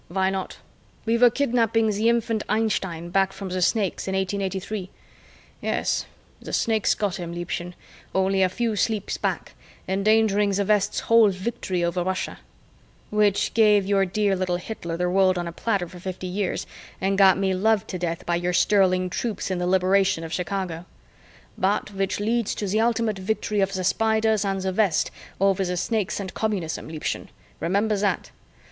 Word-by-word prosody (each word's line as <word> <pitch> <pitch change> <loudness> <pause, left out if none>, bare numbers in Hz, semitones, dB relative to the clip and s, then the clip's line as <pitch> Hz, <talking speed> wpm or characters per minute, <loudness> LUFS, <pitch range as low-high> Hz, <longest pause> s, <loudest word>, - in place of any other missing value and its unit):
"Why 190 +2 0
not? 190 -1 -4 0.5
We 225 +1 +2
were 245 0 +7
kidnapping 230 -4 +1
the 215 +3 +2
infant 230 -2 +1
Einstein 190 -6 -1
back 195 +1 +2
from 195 -1 -7
the 185 0 -2
Snakes 200 0 0
in 190 - -1
1883. 190 0 -2 0.7
Yes, - - -1 0.3
the - - -8
Snakes 220 -2 +2
got 205 -2 -1
him, 170 -2 -5
Liebchen, 175 0 -4 0.4
only 190 0 +2
a 185 - +4
few 230 +3 -1
sleeps 210 0 -1
back, - - -2 0.3
endangering 205 +1 +3
the 200 +1 +1
West's 210 0 +1
whole 230 -2 +5
victory 190 -2 -3
over 170 +1 0
Russia 185 +1 -3 0.3
" - - -32
" - - -33
which 210 -1 +2
gave 210 -3 +5
your 195 0 +3
dear 200 +1 +1
little 185 -1 -1
Hitler 175 -3 -5
the 180 +1 0
world 185 0 +3
on 175 -1 -2
a - - -4
platter 195 0 -1
for 180 +1 -12
fifty 185 0 -6
years 185 +1 -2 0.3
and 195 +1 +1
got 195 -1 +6
me 190 -1 +1
loved 210 +2 +2
to 185 - -4
death 170 -1 -3
by 170 0 +1
your 175 +1 -1
sterling 185 -1 +3
troops 205 +2 -3
in 185 - -1
the 180 - -1
Liberation 190 -1 +2
of 165 0 -6
Chicago 180 -1 -3 0.3
" - - -28
" - - -28
but 205 +2 0
which 195 0 -1
leads 225 +1 0
to 210 - -3
the 205 +3 0
ultimate 230 -3 +1
victory 210 +1 -1
of 195 0 0
the 185 -1 -2
Spiders 220 +1 +2
and 195 -1 -1
the 190 0 -1
West 195 -4 +2 0.3
over 195 0 +3
the 180 -1 -2
Snakes 215 0 -1
and 195 -2 -5
Communism, 200 -7 -2
Liebchen, 155 -1 -4 0.3
remember 205 +5 +1
that. 200 0 -1
195 Hz, 180 wpm, -24 LUFS, 185-215 Hz, 0.7 s, were